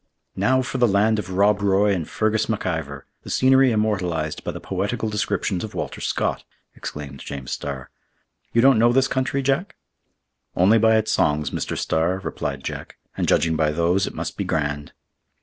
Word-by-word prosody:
"Now 130 Hz, 0 st, +2 dB
for 130 Hz, +1 st, -4 dB
the 120 Hz, -, +5 dB
land 105 Hz, +2 st, +2 dB
of 95 Hz, -3 st, -5 dB
Rob 100 Hz, +2 st, +2 dB
Roy 100 Hz, +1 st, +3 dB
and 85 Hz, -5 st, -3 dB
Fergus 110 Hz, 0 st, 0 dB
MacIvor!—the 80 Hz, -, -4 dB
scenery 130 Hz, 0 st, +4 dB
immortalized 90 Hz, -8 st, -1 dB
by -, -, -4 dB
the -, -, -7 dB
poetical 105 Hz, +4 st, -2 dB
descriptions 105 Hz, -3 st, -1 dB
of 110 Hz, -, -7 dB
Walter -, -, -4 dB
Scott," -, -, -1 dB, 0.3 s
exclaimed 70 Hz, -2 st, -7 dB
James 70 Hz, -3 st, -7 dB
Starr. 70 Hz, -3 st, -5 dB, 0.6 s
"You 115 Hz, -, +3 dB
don't 135 Hz, -4 st, +6 dB
know 120 Hz, +1 st, +5 dB
this 135 Hz, +1 st, +3 dB
country, 135 Hz, +1 st, -1 dB
Jack?" 140 Hz, +9 st, 0 dB, 0.8 s
"Only 100 Hz, +6 st, +5 dB
by 110 Hz, 0 st, +4 dB
its 110 Hz, 0 st, 0 dB
songs, 75 Hz, -1 st, +1 dB
Mr. -, -, -3 dB
Starr," 85 Hz, +4 st, 0 dB
replied 95 Hz, -, -4 dB
Jack; -, -, -6 dB, 0.2 s
"and -, -, -1 dB
judging 80 Hz, -1 st, +2 dB
by 80 Hz, 0 st, +2 dB
those, 85 Hz, +5 st, +1 dB
it -, -, -7 dB
must -, -, -5 dB
be -, -, -1 dB
grand." 75 Hz, -1 st, -2 dB
100 Hz, 170 wpm, -23 LUFS, 80-110 Hz, 0.8 s, don't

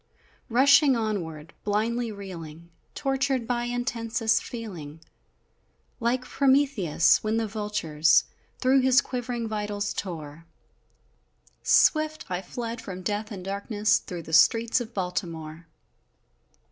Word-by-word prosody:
Rushing 275 Hz, +3 st, +5 dB
onward, 170 Hz, -9 st, -3 dB
blindly 225 Hz, +3 st, 0 dB
reeling, 170 Hz, -5 st, -9 dB, 0.2 s
Tortured 270 Hz, -2 st, 0 dB
by 240 Hz, 0 st, -1 dB
intensest 235 Hz, -2 st, 0 dB
feeling 175 Hz, -11 st, -8 dB, 1.0 s
Like 245 Hz, +2 st, 0 dB
Prometheus, 265 Hz, -, +3 dB
when 215 Hz, +1 st, 0 dB
the 225 Hz, -, 0 dB
vultures 205 Hz, -8 st, +2 dB, 0.3 s
Through 265 Hz, +1 st, +3 dB
his 260 Hz, -1 st, +5 dB
quivering 245 Hz, -2 st, -3 dB
vitals 205 Hz, -1 st, -3 dB
tore 165 Hz, -3 st, -6 dB, 1.2 s
Swift 310 Hz, 0 st, +3 dB
I 180 Hz, 0 st, -1 dB
fled 230 Hz, +4 st, -6 dB
from 185 Hz, -4 st, -7 dB
death 210 Hz, +3 st, -2 dB
and 185 Hz, -3 st, -7 dB
darkness, 205 Hz, +1 st, +1 dB
Through 175 Hz, -2 st, -7 dB
the 160 Hz, -, -9 dB
streets 230 Hz, +9 st, +4 dB
of 235 Hz, -1 st, -7 dB
Baltimore! 170 Hz, -3 st, -4 dB
215 Hz, 110 wpm, -26 LUFS, 180-245 Hz, 1.2 s, Rushing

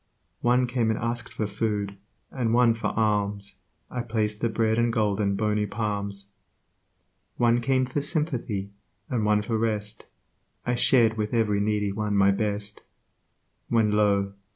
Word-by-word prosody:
One 125 Hz, +1 st, +3 dB
came 120 Hz, -2 st, 0 dB
and 110 Hz, -, +1 dB
asked 115 Hz, +1 st, -3 dB
for 110 Hz, -, -2 dB
food, 100 Hz, -1 st, -2 dB, 0.4 s
and 120 Hz, -3 st, 0 dB
one 120 Hz, -1 st, +5 dB
for 115 Hz, -, -2 dB
alms 105 Hz, -2 st, -1 dB, 0.3 s
I 125 Hz, -, -2 dB
placed 110 Hz, -3 st, -2 dB
the 115 Hz, -, +1 dB
bread 110 Hz, 0 st, +1 dB
and 120 Hz, 0 st, +2 dB
gold 105 Hz, -2 st, +1 dB
in 100 Hz, -1 st, +1 dB
bony 105 Hz, 0 st, 0 dB
palms. 100 Hz, -2 st, -3 dB, 1.1 s
One 120 Hz, 0 st, +3 dB
came 130 Hz, +1 st, +2 dB
for 130 Hz, +3 st, -2 dB
sympathy, 125 Hz, -, -2 dB, 0.4 s
and 115 Hz, -4 st, 0 dB
one 105 Hz, 0 st, +3 dB
for 110 Hz, 0 st, -1 dB
rest; 105 Hz, -1 st, -2 dB, 0.6 s
I 120 Hz, -, +1 dB
shared 115 Hz, -2 st, +4 dB
with 105 Hz, +2 st, -1 dB
every 105 Hz, -3 st, +2 dB
needy 105 Hz, -1 st, 0 dB
one 105 Hz, 0 st, -2 dB
my 100 Hz, 0 st, +5 dB
best; 105 Hz, 0 st, -3 dB, 0.9 s
When, 110 Hz, -3 st, +3 dB
Io! 100 Hz, -2 st, +2 dB
110 Hz, 155 wpm, -26 LUFS, 105-115 Hz, 1.1 s, one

